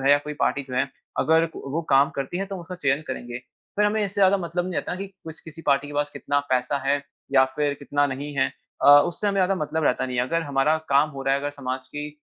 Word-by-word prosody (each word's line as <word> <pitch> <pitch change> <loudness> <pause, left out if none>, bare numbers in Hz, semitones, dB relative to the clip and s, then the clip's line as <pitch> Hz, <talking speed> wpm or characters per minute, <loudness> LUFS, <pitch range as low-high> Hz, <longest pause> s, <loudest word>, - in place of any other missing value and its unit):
है 135 - +4
या 145 - +7
कोई 150 - -4
पार्टी 140 - +1
जो 125 - -5
है, - - +1 0.3
अगर 160 +1 +3
वो 150 +5 -4
काम 135 +1 +5
करती 140 +6 -3
है, 195 - -2
तो 195 - -6
हम 185 - -6
उसका 180 +2 -8
चयन 140 -3 0
करेंगे। 120 -2 -5 0.4
फिर 210 - +3
हमें 215 0 +1
इससे 200 -1 -5
ज़्यादा 195 0 +6
मतलब 175 -1 -2
नहीं 185 0 -4
रहता - - -2
ना 180 - -4
कि 195 - -4
किस 165 -5 -12
किसी 165 0 -12
पार्टी 140 0 +3
के 145 - -9
पास 145 0 0
कितना 145 0 -1
पैसा 130 +2 +1
है 140 0 +2 0.3
या 130 -1 +6
फिर 145 -1 +1
कितना 145 0 +1
नहीं 140 +2 -5
है 135 - +4 0.4
अ, - - +7 0.2
उससे 175 +4 -3
हमें 200 -1 +1
ज़्यादा 190 +1 +3
मतलब 160 -2 -2
रहता 125 - +2
नहीं 125 -1 -4
है। 125 - +3
अगर 165 +7 0
हमारा 145 +1 +2
काम 140 +2 +4
हो 135 -2 -7
रहा 135 0 +2
है, 140 - 0
अगर 145 +1 -2
समाज 130 -2 -5
की 150 0 -5
145 Hz, 270 wpm, -24 LUFS, 135-170 Hz, 0.4 s, या